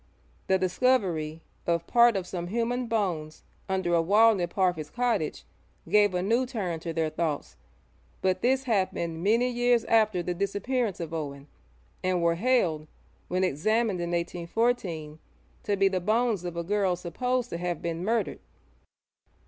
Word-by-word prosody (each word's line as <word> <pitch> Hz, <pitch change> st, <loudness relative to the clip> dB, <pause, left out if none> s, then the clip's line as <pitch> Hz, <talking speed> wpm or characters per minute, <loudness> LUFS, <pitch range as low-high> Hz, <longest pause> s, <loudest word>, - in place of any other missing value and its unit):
The 190 Hz, -, +4 dB
discovery 180 Hz, -6 st, 0 dB, 0.2 s
of 170 Hz, 0 st, +1 dB
part 235 Hz, +1 st, +5 dB
of 190 Hz, -2 st, -2 dB
some 175 Hz, -1 st, -5 dB
human 235 Hz, +4 st, -1 dB
bones 175 Hz, -9 st, -2 dB, 0.3 s
under 190 Hz, -2 st, 0 dB
a 170 Hz, -, +4 dB
wall 215 Hz, +6 st, +5 dB
near 180 Hz, -4 st, -1 dB
Parfitt's 175 Hz, -4 st, 0 dB
cottage 240 Hz, -10 st, -1 dB, 0.4 s
gave 205 Hz, +1 st, +4 dB
a 180 Hz, -, 0 dB
new 235 Hz, +6 st, +1 dB
turn 190 Hz, -10 st, -3 dB
to 165 Hz, +1 st, -5 dB
their 160 Hz, -1 st, -1 dB
thoughts, 155 Hz, -2 st, -3 dB, 0.6 s
but 185 Hz, 0 st, 0 dB
this 260 Hz, +2 st, +2 dB
happened 185 Hz, -8 st, -1 dB
many 230 Hz, +5 st, +3 dB
years 245 Hz, -1 st, +2 dB
after 215 Hz, -5 st, +3 dB
the 180 Hz, -, -2 dB
disappearance 205 Hz, +4 st, -1 dB
of 165 Hz, -1 st, -5 dB
Owen, 140 Hz, -3 st, -5 dB, 0.6 s
and 185 Hz, -2 st, +1 dB
were 170 Hz, 0 st, +3 dB
held, 170 Hz, -7 st, +1 dB, 0.4 s
when 185 Hz, +1 st, 0 dB
examined 195 Hz, +5 st, +1 dB
in 170 Hz, -, -2 dB
1814, 170 Hz, -2 st, -2 dB, 0.4 s
to 205 Hz, -1 st, -1 dB
be 195 Hz, 0 st, +4 dB
the 190 Hz, -1 st, 0 dB
bones 215 Hz, -1 st, +1 dB
of 175 Hz, -1 st, -5 dB
a 170 Hz, -, -1 dB
girl 195 Hz, 0 st, +1 dB
supposed 245 Hz, +9 st, -2 dB
to 170 Hz, -, -3 dB
have 175 Hz, -2 st, -2 dB
been 170 Hz, 0 st, -3 dB
murdered. 225 Hz, +3 st, 0 dB
185 Hz, 155 wpm, -27 LUFS, 170-225 Hz, 0.6 s, part